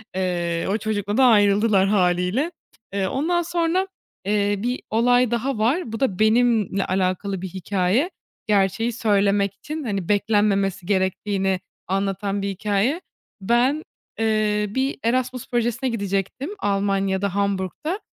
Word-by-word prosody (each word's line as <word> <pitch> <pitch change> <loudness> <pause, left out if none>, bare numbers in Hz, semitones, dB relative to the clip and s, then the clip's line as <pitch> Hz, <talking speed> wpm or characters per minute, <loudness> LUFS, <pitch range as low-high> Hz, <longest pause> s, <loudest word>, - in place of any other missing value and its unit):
Eee, 175 -2 -1
o 205 - +1
çocukla 210 -1 -2
da 265 - +6
ayrıldılar, 205 -3 +4
hâliyle. 185 - +1 0.4
Eee, 195 -1 0
ondan 330 - 0
sonra, 345 +2 0 0.4
eee, 205 0 +1
bir 245 +4 -2
olay 245 +2 +3
daha 240 +2 -1
var. 235 +5 0
Bu 225 - -4
da 205 -9 0
benimle 220 -3 +3
alakalı 185 +1 -1
bir 190 - -4
hikâye, 190 - 0 0.4
Gerçeği 205 +3 +1
söylemek 200 -3 +2
için, 305 +9 -6
hani, 200 -7 -3
beklenmemesi 205 -3 +1
gerektiğini 190 0 0 0.3
anlatan 195 +1 -1
bir 200 - -2
hikâye. 210 - 0 0.4
Ben, 245 +9 +2 0.4
eee, 215 -1 +1
bir 265 +6 -1
Erasmus 250 +1 -1
projesine 240 +2 0
gidecektim 200 - -2
Almanya'da, 195 -1 0
Hamburg'ta 200 - -1
205 Hz, 120 wpm, -23 LUFS, 195-240 Hz, 0.4 s, da